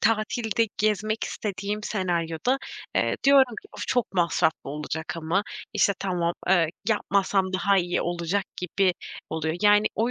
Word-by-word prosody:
tatilde 225 0 +1
gezmek 215 +1 0
istediğim 205 +1 -4
senaryoda, 175 - 0 0.4
eee, - - +1
diyorum 270 -4 +6
ki: 405 - -17
"Of! - - -6
Çok 245 -6 0
masraflı 170 -5 +1
olacak 155 +3 -4
ama, 165 +5 0 0.3
işte, 200 - +3
tamam, 175 -3 0 0.2
eee, 175 -3 +5 0.2
yapmasam 195 -3 +1
daha 195 +1 +3
iyi 175 0 0
olacak." 175 +3 -1
gibi 180 +1 +1 0.4
oluyor. 160 +1 -2
Yani, 210 0 +5
o 230 +3 +1
195 Hz, 135 wpm, -26 LUFS, 170-215 Hz, 0.4 s, diyorum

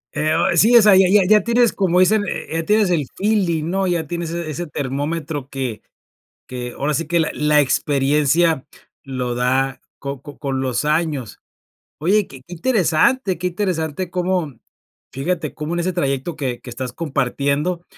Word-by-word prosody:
Eh, 155 +2 +1
o - - +2
e 170 - 0
sí, 225 +8 +6
o - - +8
sea 210 -2 +6
ya 190 0 +6
ya 205 -1 +6
ya 210 +1 +6
tienes 235 +1 +3
como 180 -3 +2
dicen, 205 +3 +4
eh - - -4
eh, - - -3
ya 165 - -3
tienes 210 -1 +3
el 150 -6 0
feeling, 190 -7 +1
¿no? 190 +1 0
Ya 170 -3 0
tienes 170 +1 -4
ese 170 -1 -4
ese 170 +3 -4
termómetro 145 +1 -3
que 130 -6 -4 0.7
que, 125 -1 -6
ahora 145 +2 -1
sí 165 - -1
que, 170 +1 +1
la 160 - +1
la 150 0 +3
experiencia 145 +3 +2 0.4
lo 125 -3 -3
da 130 +2 0 0.2
co 140 -1 -6
co 145 -2 -11
con 135 -2 -2
los 130 +1 -1
años. 150 -6 -1 0.6
Oye, 195 +6 +2
que 135 -1 -13
que 175 - -16
interesante 190 - +1
que 180 - -2
interesante, 180 -2 -2
cómo 180 -4 -1 0.6
fíjate, 155 +1 -3
cómo 150 +2 -5
en 175 - -1
ese 180 +1 -1
trayecto 140 0 -2
que 130 -5 -3
que - - -12
estás 125 0 -5
compartiendo, 145 +3 -1
160 Hz, 185 wpm, -20 LUFS, 140-180 Hz, 0.7 s, o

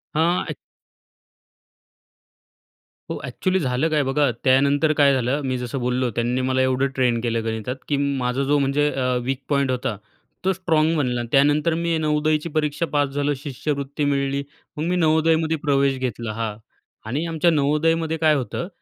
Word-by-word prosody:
हां, 170 +3 +2
एक्च - - -4 2.5
हो. - - -4
एक्चुअली 185 0 -1
झालं 135 +1 0
काय, 150 -2 +2
बघा 140 +1 +2
त्यानंतर 140 +3 +3
काय 140 -2 +5
झालं, 130 +3 0
मी 130 -1 -1
जसं 125 +2 -4
बोललो 125 0 0
त्यांनी 120 +2 0
मला 130 0 +1
एवढं 130 +1 +2
ट्रेन 125 -3 +2
केलं 115 -1 -1
गणितात, 110 +2 -3
की 145 - 0
माझा 135 -2 0
जो, 145 +2 +2
म्हणजे 140 +2 +1
अ, 130 -1 -2 0.2
वीक 135 +2 -2
पॉईंट 140 -2 +1
होता 125 -4 -2 0.5
तो 190 - +4
स्ट्राँग 165 -3 +1
बनला. 125 -4 0
अन् 120 - -6
त्यानंतर 145 +4 +3
मी 170 0 0
नवोदयची 155 +1 0
परीक्षा 150 +1 -1
पास 145 -1 +2
झालो, 145 +1 0
शिष्यवृत्ती 140 +1 -4
मिळाली, 140 0 0 0.3
मग 150 - -2
मी 180 - +1
नवोदयमध्ये 160 -1 +2
प्रवेश 140 -2 +1
घेतला, 120 -3 -3
हां. 110 -1 -3 0.5
आणि 145 +7 -1
आमच्या 165 +1 +2
नवोदयमध्ये 160 +2 +1
काय 155 -1 +4
होतं, 140 +5 -3
140 Hz, 160 wpm, -22 LUFS, 130-155 Hz, 2.5 s, काय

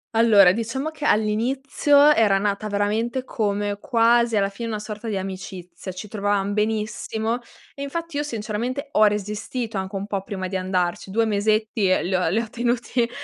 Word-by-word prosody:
Allora, 210 -5 +7
diciamo 230 +8 -3
che 300 -2 -6
all'inizio, 270 +7 +3
era 210 -6 +4
nata 205 +1 -1
veramente 220 +5 -1
come 205 -3 -2
quasi 235 -1 +3
alla 195 0 +2
fine, 230 +4 -6
una 215 - -2
sorta 210 +1 -7
di 205 -3 -1
amicizia. 185 -1 -7
Ci 185 +4 -8
trovavamo 205 -1 -1
benissimo, 220 +2 -1 0.3
e 280 - -10
infatti 330 +2 -4
io - - +1
sinceramente 240 +3 -4
ho 215 - +5
resistito 210 +2 -2
anche 190 +1 -5
un 195 - -3
po' 200 -2 -3
prima 190 -2 -5
di 190 - -5
andarci, 185 0 -1
2 225 +3 +1
mesetti 215 -1 +1
e 185 - +2
li 185 - -2
ho 185 -2 +2
li 210 - +1
ho 230 - -3
tenuti. 240 +1 -1
215 Hz, 170 wpm, -23 LUFS, 200-235 Hz, 0.3 s, Allora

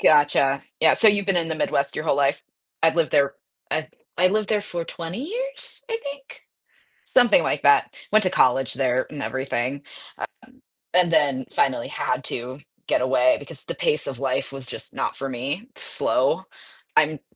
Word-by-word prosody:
Gotcha, 145 -2 +4 0.2
yeah, 160 - +6
so, 225 - +5
you've 205 -1 +2
been 195 - +2
in 165 -1 0
the 160 - -1
Midwest 140 -2 0
your 155 - -3
whole 145 - +2
life? 140 -1 +1 0.4
I've 160 +1 +4
lived 165 -2 +1
there 140 -1 +3 0.4
I've 155 0 -1 0.3
I 185 +1 +5
lived 210 +1 0
there 210 -1 +2
for 175 -4 -5
20 175 - -6
years, - - -6
I 455 - -1
think 280 -1 -9 0.6
something 245 -4 +5
like 145 - -1
that, 145 - +4 0.2
went 215 0 +5
to 185 - +2
college 130 -5 +3
there 130 -1 +1
and 150 -2 -7
everything, 130 +1 -2 0.4
um, - - -3 0.7
and 175 -2 +4
then 140 -4 +2
finally - - +1
had - - -2
to 125 +2 -5 0.3
get - - +2
away 125 0 +3
because 145 0 -11
the - - -5
pace 150 - 0
of 130 -3 -5
life 135 0 -1
was 135 -1 -7
just - - -9
not - - -2
for 135 - -4
me, 140 - -3
slow. - - 0 0.5
I'm 155 -1 +3
150 Hz, 180 wpm, -23 LUFS, 135-185 Hz, 0.7 s, yeah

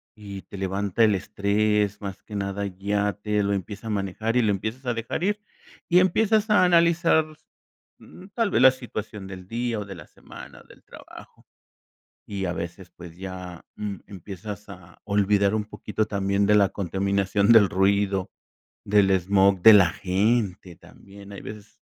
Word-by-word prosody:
y 100 -2 -9
te 100 - -11
levanta 95 +3 0
el 105 -2 +4
estrés. 105 +1 0
Más 100 -1 -7
que 105 - -10
nada, 100 0 -3
ya 100 +2 -1
te 105 0 -2
lo 100 0 0
empieza 100 +3 -5
a - - -4
manejar 105 +3 -2
y - - +4
lo 105 - +2
empiezas 110 +7 -4
a 120 - 0
dejar 115 +9 -4
ir, 205 +2 0 0.5
y 175 - +6
empiezas 215 +4 +2
a 210 -3 +5
analizar, 170 -2 +3 0.7
mm, 185 - -14
tal 230 -3 +1
vez - - +2
la 130 - +8
situación 110 -5 -7
del 95 -1 -10
día, 115 0 -2
o, 100 - -5
de 95 -2 -9
la 75 - -12
semana, - - -13
del - - -19
trabajo. - - -15 0.8
Y 100 -2 -4
a 90 - -2
veces, 85 +1 -7
pues 85 -2 -13
ya, 90 -2 -8
mm, 105 -2 -4
empiezas 100 +2 -9
a 90 -4 -14
olvidar 100 0 +2
un 105 - -1
poquito 105 0 -3
también 100 0 0
de 105 - +4
la 100 -2 +4
contaminación 100 +2 +1
del 105 -4 +6
ruido, 95 0 +1 0.5
del 100 -1 +3
smog 95 0 +2
de 110 - +10
la 95 -4 +6
gente 95 -1 -1
también, 100 0 -15
hay 100 - -8
veces 105 -1 -11
100 Hz, 170 wpm, -24 LUFS, 95-110 Hz, 0.8 s, de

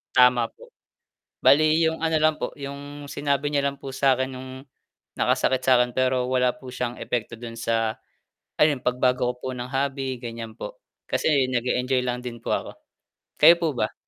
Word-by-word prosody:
Tama 125 -2 +5
po. - - -16 0.8
Bale 140 +4 +6
yung 160 -1 +1
ano 160 -1 +1
lang 155 0 +4
po, - - -4
yung 145 +1 -8
sinabi 145 0 -1
niya 140 -1 +1
lang 140 0 -2
po 135 - -6
sa 135 0 +3
akin 130 +1 -2
nung 130 0 -8 0.7
nakasakit 130 -1 +2
sa 130 -1 +5
akin, 125 0 +1
pero 130 -1 +1
wala 125 -1 +2
po 130 -5 -12
siyang 125 -1 -3
epekto 120 -1 -3
dun 115 0 -8
sa, 115 -1 0 0.6
ayun 150 -4 +4
pagbago 125 0 +1
ko - - -18
po 130 - -5
ng 125 +1 -5
hobby 135 -1 -2
ganyan 115 -2 -7
po, - - -7 0.3
kasi 140 -4 +2
nag-eenjoy 125 +1 +1
lang 125 0 -2
din 120 -1 -5
po - - -3
ako. - - -2 0.7
Kayo 165 +3 +9
po 165 - +1
ba? 110 -2 -1
130 Hz, 180 wpm, -24 LUFS, 125-140 Hz, 0.8 s, Kayo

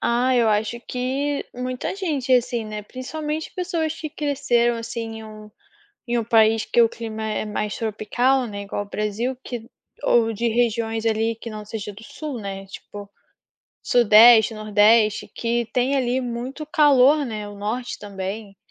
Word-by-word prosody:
Ah, 245 +2 +2
eu 235 -2 +4
acho 215 +2 0
que 270 +3 -2
muita 250 +4 -3
gente, 295 -10 -1
assim, 240 -2 +2
né, 215 -1 -6
principalmente 300 +7 -5
pessoas 335 -4 -2
que 310 - -5
cresceram, 260 -5 +1
assim, 230 +1 -5 0.2
em 220 - -9
um 215 -1 -11 0.6
em 240 0 0
um 230 - -1
país 225 -1 +4
que - - +2
o 230 - +6
clima 220 -1 -6
é 215 -1 -2
mais 210 0 -3
tropical, 240 +4 0
né, 200 -2 -6
igual 200 0 -4
ao 205 - -11
Brasil 215 +5 -2
que 235 -2 -6 0.3
ou 225 -1 +3
de 235 +2 -1
regiões 225 -1 0
ali 225 0 +1
que 230 +1 -8
não 215 -1 -7
seja 210 -1 -6
do 200 +3 -13
sul, 280 +2 -6
né, 195 -1 -6
tipo, 200 +1 -10 0.7
sudeste, 225 -1 +6
nordeste 215 0 +3
que 235 0 -1
tem 255 +2 +1
ali 255 -1 +1
muito 250 +4 -5
calor, 290 -1 +4
né, 215 -4 -5
o 205 - -9
norte 220 +5 -4
também. 200 0 -6
230 Hz, 165 wpm, -23 LUFS, 215-255 Hz, 0.7 s, o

